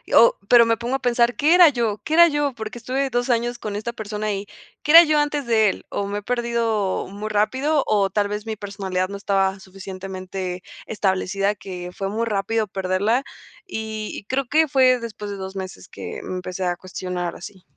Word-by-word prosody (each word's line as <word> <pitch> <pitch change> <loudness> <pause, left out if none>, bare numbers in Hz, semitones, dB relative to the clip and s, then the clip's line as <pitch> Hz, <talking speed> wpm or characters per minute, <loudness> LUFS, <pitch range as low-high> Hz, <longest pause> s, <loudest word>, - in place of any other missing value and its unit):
o, 235 - +7
pero 235 0 +7
me 230 -1 +2
pongo 240 +3 -2
a - - -1
pensar, 245 -1 +2
¿qué 305 +3 +3
era 355 -2 +8
yo? 230 -6 -1
¿Qué 315 - -1
era 340 0 +8
yo? 290 -3 0
Porque 220 +2 -6
estuve 265 +3 -2
2 245 +2 -1
años 240 0 0
con 210 -1 -5
esta 225 +3 -4
persona 210 -1 -3
y, 200 +1 -5 0.3
¿qué 300 - +1
era 335 +1 +12
yo 305 -1 +2
antes 295 -2 -1
de 220 -3 +4
él? - - -6
¿O 200 - -3
me 205 +1 -3
he - - -15
perdido 235 -4 -1
muy 205 +3 -6
rápido, 260 +8 +1
o 200 -2 +2
tal 205 +1 0
vez 210 +2 -5
mi 220 - -2
personalidad 195 -2 -3
no 200 - -5
estaba 195 -1 0
suficientemente 185 -1 -7 0.2
establecida, 195 0 0
que 180 -3 -8
fue 195 -1 -3
muy 225 +3 -1
rápido 220 +1 0
perderla? 195 +6 0 0.5
Y-y 220 - -5
creo 260 +4 -1
que 315 +1 +4
fue 260 -2 +4
después 210 -3 -7
de 200 - -5
2 190 0 -7
meses 190 0 -7
que, - - -7
mm, 185 - -4
empecé 185 +1 -5
a 175 - 0
cuestionar 180 -1 -5
así. 190 0 -10
215 Hz, 205 wpm, -22 LUFS, 195-245 Hz, 0.5 s, era